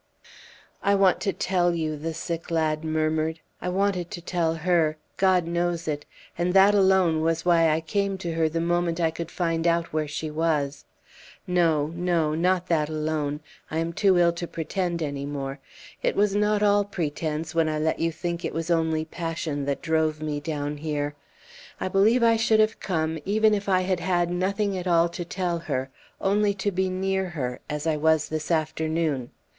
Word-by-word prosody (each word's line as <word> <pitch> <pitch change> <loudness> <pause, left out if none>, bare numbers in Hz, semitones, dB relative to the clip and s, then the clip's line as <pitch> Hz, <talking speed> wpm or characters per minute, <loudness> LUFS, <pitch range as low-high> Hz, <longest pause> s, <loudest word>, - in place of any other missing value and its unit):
"I 200 0 +3
want 195 -2 +4
to 200 - +1
tell 175 -2 +1
you," 155 -2 -1
the 160 +2 -4
sick 165 +1 -4
lad 160 -2 0
murmured. 155 0 0 0.2
"I 180 - -2
wanted 185 -2 0
to 210 - -6
tell 170 -2 -1
her 165 -2 +1 0.2
God 185 -3 +3
knows 170 0 -1
it 145 -1 -3 0.3
and 175 +2 -1
that 195 +2 +7
alone 190 -5 +4
was 165 +1 0
why 165 -2 +4
I 155 +1 +1
came 195 +4 -1
to 175 -3 -4
her 160 -1 +1
the 165 +1 -2
moment 170 0 0
I 165 -1 +2
could 165 0 -6
find 165 -2 -1
out 170 -1 +1
where 155 -1 0
she 150 +1 -4
was. 150 -3 -1 0.6
No 165 -5 +2
no 170 -3 0
not 180 +2 +1
that 160 -4 +1
alone! 155 -1 -2 0.3
I 155 - -3
am 165 +1 -1
too 190 0 +3
ill 170 -1 +5
to 170 0 -5
pretend 170 +1 -2
any 140 -2 -3
more. 140 -1 -4 0.4
It - - 0
was 205 0 +2
not 210 0 +2
all 205 0 +4
pretence 160 -4 -3
when 165 -1 +2
I 155 - -1
let 155 +1 0
you 165 0 +1
think 170 +1 -4
it - - -3
was 165 +1 -2
only 160 -1 +1
passion 160 -3 -3
that 140 0 -2
drove 160 -2 +1
me 150 -1 -3
down 145 -1 -3
here. 145 -1 -2 0.7
I - - -2
believe 220 +6 +4
I 230 -1 +5
should 220 -1 +3
have 215 0 +2
come, 160 -3 -1
even 215 +3 +3
if 200 -1 -1
I 185 -1 +4
had 185 -1 0
had 175 -1 +1
nothing 195 +3 0
at 185 0 -4
all 170 -1 +4
to 175 +1 -5
tell 175 -1 -2
her 130 -5 -3 0.3
only 200 +1 +2
to 200 +1 -1
be 190 0 0
near 190 0 -1
her 130 -7 -4
as 150 0 -3
I 160 -2 +1
was 160 0 +2
this 155 -1 -3
afternoon! 155 -4 0
165 Hz, 190 wpm, -25 LUFS, 155-185 Hz, 0.7 s, that